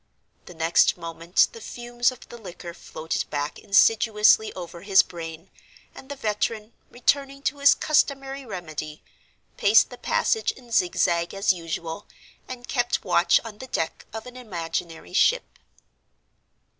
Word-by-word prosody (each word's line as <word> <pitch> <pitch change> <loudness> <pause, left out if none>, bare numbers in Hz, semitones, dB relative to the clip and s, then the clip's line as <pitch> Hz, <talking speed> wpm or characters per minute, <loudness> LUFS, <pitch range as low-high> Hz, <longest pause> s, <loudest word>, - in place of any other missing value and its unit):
The 180 - -11
next 165 +2 +3
moment 165 +1 +1
the 230 - -12
fumes 240 +1 -1
of 255 - -14
the 240 - -10
liquor 175 -4 -9
floated 160 -1 -5
back 145 0 -3
insidiously 215 +1 +4
over 175 -2 -8
his 195 0 +5
brain; 165 0 -9 0.4
and 265 - -13
the 285 - -5
veteran, 215 -1 -2 0.2
returning 275 +2 0
to 285 - -1
his 280 0 +6
customary 275 -2 0
remedy, 155 - -7 0.5
paced - - +5
the - - -10
passage 445 - +1
in 245 -2 -17
zigzag 175 -3 +1
as 195 -1 +3
usual, 165 +1 -6 0.4
and 250 -1 -8
kept 245 -4 -1
watch 175 -1 +4
on 215 -2 -9
the 260 - -8
deck 165 -9 -3
of 220 +1 -7
an 250 0 -11
imaginary 170 - -5
ship. - - +2
205 Hz, 140 wpm, -25 LUFS, 170-245 Hz, 0.5 s, his